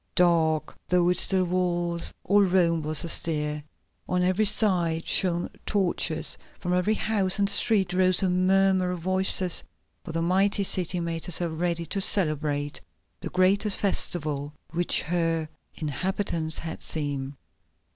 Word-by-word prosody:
Dark 165 -3 +1
though 180 -1 +3
it 180 - +1
still 185 -1 +3
was, 175 -1 -1
all 205 +2 +3
Rome 175 -4 +2
was 155 0 +2
astir. 150 -3 +1 0.5
On 180 0 +1
every 185 +4 +1
side 175 -6 +1
shone 175 -2 +1 0.2
torches, 175 -5 0 0.2
from 180 - -2
every 180 +4 +1
house 205 -3 +1
and 200 -1 +1
street 200 -2 +2
rose 185 0 +3
the 190 - +1
murmur 185 0 +2
of 180 - -3
voices, 185 0 +1 0.4
for 170 - -7
the 165 +1 -2
mighty 195 +3 +1
city 180 -2 -2
made 165 -1 -3
herself 175 -1 -2
ready 170 +1 -2
to 195 +5 -3
celebrate 150 -6 -1 0.4
the - - -6
greatest 195 +3 +2
festival 150 -7 +1 0.2
which 175 +1 +1
her 165 -1 -1 0.3
inhabitants 160 +1 -3
had 160 0 -6
seen. 140 -3 -4
175 Hz, 135 wpm, -25 LUFS, 160-190 Hz, 0.5 s, though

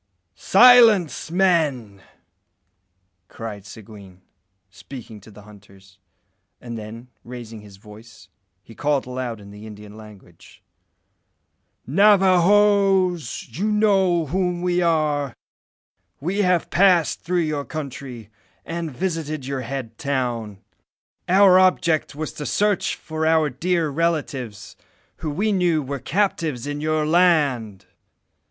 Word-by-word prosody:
"Silence, 220 - +5
men!" 155 - 0 1.3
cried 105 -2 -9
Seguin, 100 -4 -14 0.5
speaking 110 +1 -11
to 105 - -16
the 105 0 -15
hunters; 95 -2 -19 0.6
and 120 -1 -8
then, 115 +3 -9
raising 115 -3 -10
his 100 -2 -15
voice, 105 +3 -16 0.4
he 115 - -15
called 145 +3 -1
aloud 125 -3 -5
in 100 -1 -13
the 105 +2 -11
Indian 105 -1 -12
language 105 -6 -16 1.2
"Navajoes! 195 - +3
you 200 - -2
know 195 -5 +2
whom 180 +2 -2
we 180 0 0
are. 150 -5 0 0.8
We 180 +8 -3
have 180 -3 0
passed 180 -3 +3
through 175 +1 -1
your 155 -3 -2
country, 130 -7 -8 0.3
and 165 -1 -4
visited 155 -2 -4
your 135 -1 -4
head 130 0 -7
town. 120 -8 -3 0.7
Our 185 0 +6
object 170 -5 +1
was 155 +1 -5
to 150 - -6
search 205 -2 0
for 160 0 -6
our 160 -2 +2
dear 165 +4 -1
relatives, 135 - -3 0.4
who 155 - -5
we 200 +9 -1
knew 175 -5 +1
were 140 +1 -5
captives 160 - -2
in 145 0 -5
your 155 0 0
land. 145 - +1
150 Hz, 115 wpm, -22 LUFS, 115-180 Hz, 1.3 s, Our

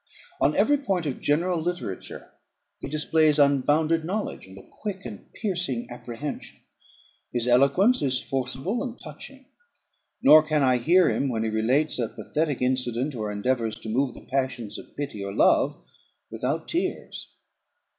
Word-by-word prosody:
On - - +2
every 290 - +4
point 195 - -1
of 140 -4 -3
general 170 +3 +1
literature 175 - -5 0.5
he - - -6
displays 155 0 +2
unbounded 150 +3 +3
knowledge, 195 - -4
and 95 +1 -13
a - - -14
quick 200 -6 -7
and 110 -5 -9
piercing 180 - -2
apprehension. 120 +4 -7 0.7
His 120 -1 -1
eloquence 140 - +4
is 130 -3 +1
forcible 135 - -2
and 250 -2 -6
touching; 270 -1 -11 0.7
nor 155 +1 +8
can 155 -2 0
I 130 -1 +4
hear 170 +8 +4
him, 140 - 0
when 115 -3 -1
he 110 - -1
relates 125 +8 +1
a 120 - 0
pathetic 135 +5 -2
incident, 125 +2 0
or 110 -4 -3
endeavours 115 +1 -1
to 110 - -6
move 125 +2 0
the - - -13
passions 130 -5 -2
of - - -15
pity 140 -8 -4
or 100 0 -5
love, - - +3 0.5
without - - -2
tears. - - -3
140 Hz, 150 wpm, -25 LUFS, 120-160 Hz, 0.7 s, nor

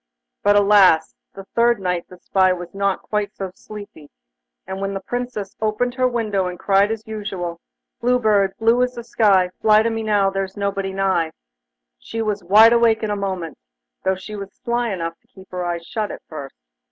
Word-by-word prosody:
But, 205 0 +4
alas! 200 -6 +5 0.2
the 195 - -9
third 235 -1 +3
night 180 -2 -2
the 180 - -12
spy 185 +1 +2
was 175 -1 -8
not 200 -1 -1
quite 210 -1 -2
so 190 -2 -5
sleepy, 200 -8 -11 0.6
and 190 +1 -6
when 195 0 -2
the - - -2
Princess 245 -4 -5
opened 220 +3 0
her 255 0 +2
window 215 -6 -1
and 180 0 -5
cried 195 +2 +3
as 225 0 -4
usual: 195 -6 -5 0.4
'Blue 250 +1 +2
Bird, 205 -5 +2
blue 230 +2 +3
as 250 0 0
the 235 - -6
sky, 210 -6 +3
Fly 215 0 +5
to 230 - 0
me 225 0 -2
now, 205 -3 +2
there's 195 0 -3
nobody 200 -1 -2
nigh,' 190 -4 0 0.7
she 225 - -6
was 210 -2 -1
wide 215 +6 +7
awake 230 -1 +3
in 215 - -1
a - - 0
moment, 185 -5 -4 0.4
though 190 - +1
she 190 +3 -8
was 195 -1 -7
sly 240 0 -1
enough 165 -3 -4
to 235 - -39
keep 190 -6 -17
her 180 -1 -3
eyes 170 -1 -3
shut 215 +2 -3
at - - -8
first. 140 -4 -8
200 Hz, 195 wpm, -21 LUFS, 190-220 Hz, 0.7 s, wide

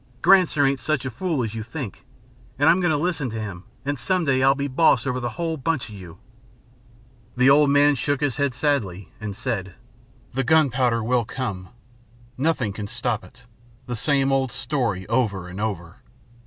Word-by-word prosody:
Granser 180 -7 +5
ain't 135 0 0
such 130 +1 -1
a 130 - -3
fool 160 0 -1
as 110 -2 -4
you 115 - -4
think, 115 - -7 0.5
and 145 +3 +3
I'm 175 - +6
going 175 - +2
to 155 - +2
listen 155 -4 -1
to 110 0 -5
him 95 -4 -6 0.2
and 145 -1 -2
some 185 +6 0
day 130 -2 +2
I'll 135 +1 +5
be 140 0 -2
boss 135 -3 +3
over 125 -1 -1
the 120 -1 -2
whole 165 -2 -2
bunch 155 -3 -2
of - - -10
you." 90 -4 -11 1.2
The 125 +2 +6
old 145 0 +5
man 145 +1 +5
shook 145 +1 -1
his 145 -4 -1
head 140 -3 0
sadly, 105 - -1
and 105 -2 -5
said: 95 -7 -3 0.6
"The 135 +2 0
gunpowder 125 -5 +2
will 120 +1 +2
come. 100 -8 -5 0.7
Nothing 130 -7 0
can 105 0 -5
stop 120 +2 -2
it 125 -1 -17 0.4
the 120 -1 -4
same 135 +3 +1
old 135 -2 +1
story 120 -9 -2
over 110 -6 0
and 95 +3 -7
over. 85 -6 -4
130 Hz, 185 wpm, -23 LUFS, 110-145 Hz, 1.2 s, I'm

